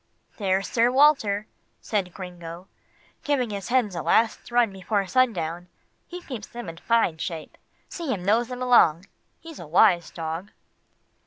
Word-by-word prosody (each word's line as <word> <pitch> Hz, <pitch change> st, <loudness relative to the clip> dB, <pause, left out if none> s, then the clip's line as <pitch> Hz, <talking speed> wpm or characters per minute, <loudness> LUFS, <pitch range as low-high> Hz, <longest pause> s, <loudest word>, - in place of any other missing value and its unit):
"There's 195 Hz, -2 st, 0 dB
Sir 235 Hz, +1 st, +2 dB
Walter," 250 Hz, -7 st, +3 dB, 0.3 s
said 195 Hz, -5 st, -2 dB
Gringo, 175 Hz, -1 st, -9 dB, 0.6 s
"giving 265 Hz, -6 st, 0 dB
his 200 Hz, -2 st, -5 dB
hens 240 Hz, -6 st, +1 dB
a 170 Hz, -, -3 dB
last 220 Hz, +8 st, +1 dB
run 240 Hz, -4 st, +2 dB
before 195 Hz, +1 st, -1 dB
sundown. 180 Hz, -6 st, 0 dB, 0.4 s
He 355 Hz, 0 st, -8 dB
keeps 240 Hz, -7 st, -7 dB
them 240 Hz, -4 st, -8 dB
in 165 Hz, -, -9 dB
fine 225 Hz, -7 st, +1 dB
shape. 160 Hz, -1 st, -6 dB, 0.3 s
See 335 Hz, -6 st, -5 dB
him 180 Hz, -6 st, -3 dB
nose 225 Hz, +4 st, +2 dB
them 250 Hz, +1 st, -5 dB
along. 190 Hz, -9 st, +4 dB, 0.4 s
He's 325 Hz, -3 st, -11 dB
a 170 Hz, -, -9 dB
wise 175 Hz, +1 st, +4 dB
dog." 165 Hz, +4 st, -6 dB
205 Hz, 150 wpm, -25 LUFS, 175-245 Hz, 0.6 s, along